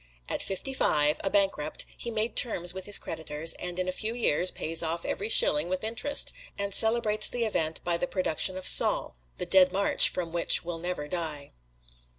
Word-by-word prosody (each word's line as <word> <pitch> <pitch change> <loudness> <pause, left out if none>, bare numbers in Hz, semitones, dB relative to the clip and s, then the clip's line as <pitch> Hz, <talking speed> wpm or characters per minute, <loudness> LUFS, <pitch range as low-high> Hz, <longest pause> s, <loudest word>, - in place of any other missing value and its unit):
At - - -4
fifty 195 +8 -5
five, 150 - +1
a 195 - -1
bankrupt, 195 -7 0
he 235 - -6
makes 225 0 +2
terms 175 -7 -2
with 190 0 -8
his 205 - +6
creditors 160 0 -4
and 180 0 -6
in 185 0 -3
a - - -1
few 220 +5 -4
years 185 -6 +1
pays 165 -1 0
off 165 +1 -4
every 205 +3 -4
shilling 150 -6 +4
with 185 +2 -4
interest, 235 +6 0 0.2
and 200 0 -3
celebrates 220 -1 +2
the 240 -1 -3
event 160 -7 -3
by 175 -1 -1
the 265 - -3
production 185 - -2
of 185 - -4
"Saul," - - +3 0.2
the - - -5
"Dead 185 -1 +4
March" 200 +2 +6
from 170 -2 -5
which 170 0 +3
will 170 -1 -6
never 175 -3 -5
die. 155 -4 -5
185 Hz, 190 wpm, -27 LUFS, 165-215 Hz, 0.2 s, his